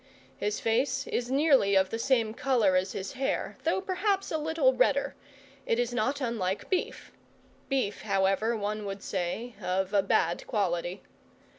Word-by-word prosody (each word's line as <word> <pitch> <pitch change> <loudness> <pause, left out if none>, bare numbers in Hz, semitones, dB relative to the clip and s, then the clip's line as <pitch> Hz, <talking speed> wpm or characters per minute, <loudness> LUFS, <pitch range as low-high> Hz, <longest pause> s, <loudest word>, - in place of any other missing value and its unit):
His 210 0 -2
face 260 +4 0
is 245 0 -2
nearly 270 -8 +4
of 190 0 +3
the 225 - -2
same 230 -3 +2
colour 235 -7 +2
as 185 +1 +1
his 190 - -4
hair, 270 0 -2
though - - +2
perhaps 385 +1 -1
a 315 - +1
little 305 -4 +2
redder: 275 +2 +2 0.5
it 230 - +2
is 245 0 0
not 260 +4 0
unlike 220 - -2
beef, 370 - -2 0.6
beef, 260 -7 -1
however, 195 +3 +1
one 210 +1 -3
would 195 0 -5
say, 195 +6 -3
of 190 +2 -1
a 200 - +5
bad 175 -3 +1
quality. 180 -4 -1
225 Hz, 155 wpm, -29 LUFS, 195-270 Hz, 0.6 s, a